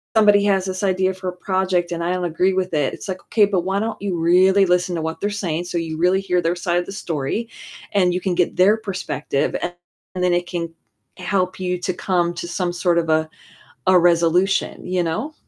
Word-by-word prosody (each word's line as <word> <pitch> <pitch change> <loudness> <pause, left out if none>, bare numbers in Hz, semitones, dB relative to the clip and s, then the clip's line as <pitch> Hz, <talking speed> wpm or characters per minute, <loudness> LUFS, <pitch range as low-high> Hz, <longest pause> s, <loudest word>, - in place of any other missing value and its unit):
somebody 205 -2 +5
has 195 -2 +2
this 185 +1 -4
idea 190 -1 +1
for 185 0 -5
a - - -6
project 185 -2 0
and 170 0 -3
I 175 - 0
don't 180 -1 -2
agree 175 +3 +1
with 185 -1 -1
it. 145 -3 +1
It's - - -8
like, 185 -1 -4
okay, 215 -2 +4
but 195 -3 0
why 190 +3 -1
don't 220 0 -3
you 190 -4 -2
really 185 +4 +4
listen 180 0 +1
to 165 - -2
what 160 +1 -4
they're 205 - 0
saying 175 -5 -2
so 175 - -3
you 165 -2 -3
really 180 +3 +3
hear 180 -2 0
their 165 0 +1
side 175 0 -1
of 175 - -4
the - - -8
story, 180 +3 -3 0.4
and 180 -3 +3
you 180 - -1
can 185 -2 -1
get 180 -1 0
their 200 +4 +5
perspective 185 -8 -2
and 175 - -3 0.4
and 180 - -3
then 180 -1 +3
it 175 0 0
can 170 -2 -3 0.5
help 185 0 -1
you 180 -1 -1
to 185 +1 -2
come 175 -1 0
to 175 - -6
some 175 0 -2
sort 175 -1 +1
of 165 -1 0
a 155 0 +2 0.6
a 185 0 +6
resolution, 175 +2 +2
you 180 0 0
know? 170 - -3
180 Hz, 230 wpm, -21 LUFS, 175-190 Hz, 0.6 s, a